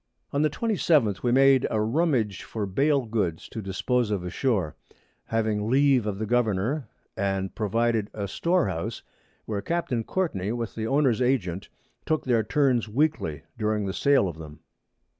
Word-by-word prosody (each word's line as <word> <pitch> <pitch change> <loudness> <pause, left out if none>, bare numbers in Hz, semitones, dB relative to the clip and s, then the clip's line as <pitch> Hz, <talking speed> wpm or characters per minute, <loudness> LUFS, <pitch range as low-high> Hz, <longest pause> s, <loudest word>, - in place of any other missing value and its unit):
On 140 - +1
the 155 - +3
27_th_ 150 - +1
we 120 - +1
made 135 0 +5
a 110 - 0
Rummage 115 - +1
for 110 -2 -4
Bale 140 +7 +1
Goods 100 -8 -2
to 110 - -6
dispose 110 +4 0
of 100 -4 -1
ashore, 90 - -1 0.5
having 110 -1 -1
Leave 135 -3 +3
of 100 -2 -2
the 110 - -2
Governour, 120 +3 0 0.3
and 95 -1 -1
provided 115 0 0
a 100 -2 -4
Store 170 - +1
house, 85 -3 -4 0.4
where 105 -2 -3
Capt. 170 +3 -2
Courtney, 110 - -1
with 115 -2 -4
the 110 0 -3
Owners 135 -3 +2
Agent 100 -8 0 0.4
took 155 -1 0
their 120 -3 +3
turns 125 -1 +1
weekly 110 - 0 0.2
during 105 -1 0
the 95 - -3
Sale 140 -3 +3
of 80 -3 -7
them. 75 -1 -10
115 Hz, 160 wpm, -26 LUFS, 100-135 Hz, 0.5 s, made